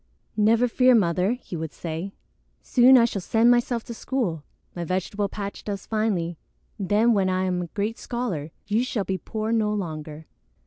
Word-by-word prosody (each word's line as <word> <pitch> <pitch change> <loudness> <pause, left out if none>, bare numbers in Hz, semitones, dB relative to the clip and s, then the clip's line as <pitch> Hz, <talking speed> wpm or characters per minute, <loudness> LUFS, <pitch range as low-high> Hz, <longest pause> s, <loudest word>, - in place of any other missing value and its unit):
"Never 225 +3 +4
fear, 250 +1 +4
Mother," 185 0 +2
he 250 -7 -8
would 160 -2 -4
say. 165 +3 -5 0.5
"Soon 255 +1 +6
I 235 - +6
shall 205 -4 -3
send 225 +6 +4
myself 240 -1 +1
to 235 - -7
school. 225 - -2 0.3
My 175 - -3
vegetable 190 +4 -2
patch 200 -1 -6
does 200 -2 -5
finely. 195 -7 -1 0.4
Then, 210 +5 +3
when 195 -3 +2
I 185 0 0
am 180 -1 0
a 175 - -4
great 210 +6 -3
scholar, 205 -12 -3 0.2
you 215 +4 +1
shall 235 -5 -2
be 190 -1 -3
poor 220 0 -3
no 220 -2 +2
longer. 155 -6 -5
205 Hz, 175 wpm, -25 LUFS, 180-230 Hz, 0.5 s, Soon